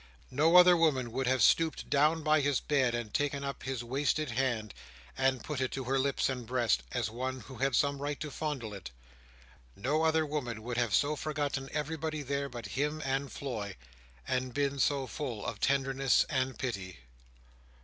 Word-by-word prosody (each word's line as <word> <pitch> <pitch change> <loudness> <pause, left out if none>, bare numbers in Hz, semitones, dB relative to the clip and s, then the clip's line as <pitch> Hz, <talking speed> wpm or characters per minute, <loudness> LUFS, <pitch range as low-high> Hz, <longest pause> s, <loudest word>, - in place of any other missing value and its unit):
No 155 +6 +3
other 180 0 +9
woman 140 -8 +2
would 130 +2 -1
have 130 -3 +3
stooped 160 +6 +3
down 155 +3 +3
by 155 0 +4
his 140 -2 +2
bed, 130 -5 +1
and 115 -3 -4
taken 140 -1 0
up 140 0 -4
his 130 -2 -3
wasted 140 +3 0
hand, 115 -4 -1 0.4
and 130 -1 +1
put 145 -3 -3
it 130 - +1
to 135 - -3
her 135 +2 0
lips 140 0 +1
and 125 -3 -4
breast, 120 - +2
as 105 - -1
one 130 +2 -3
who 130 - -11
had 135 -1 +1
some 140 +1 +1
right 145 0 -3
to 150 -2 -5
fondle 135 -8 -4
it. 100 - -8 0.9
No 145 +9 0
other 160 0 +3
woman 125 -7 -4
would 120 0 -4
have 120 -4 +2
so 145 +1 +2
forgotten 145 -3 -2
everybody 155 0 -3
there 140 +1 -2
but 120 -2 -7
him 150 +5 -1
and 135 +1 -1
Floy, 110 -8 -5 0.5
and 130 -1 -1
been 140 -1 0
so 135 +1 +2
full 125 -7 -5
of 105 - -4
tenderness 135 -2 +2
and 130 -2 0
pity. 95 - -4
135 Hz, 180 wpm, -31 LUFS, 125-145 Hz, 0.9 s, other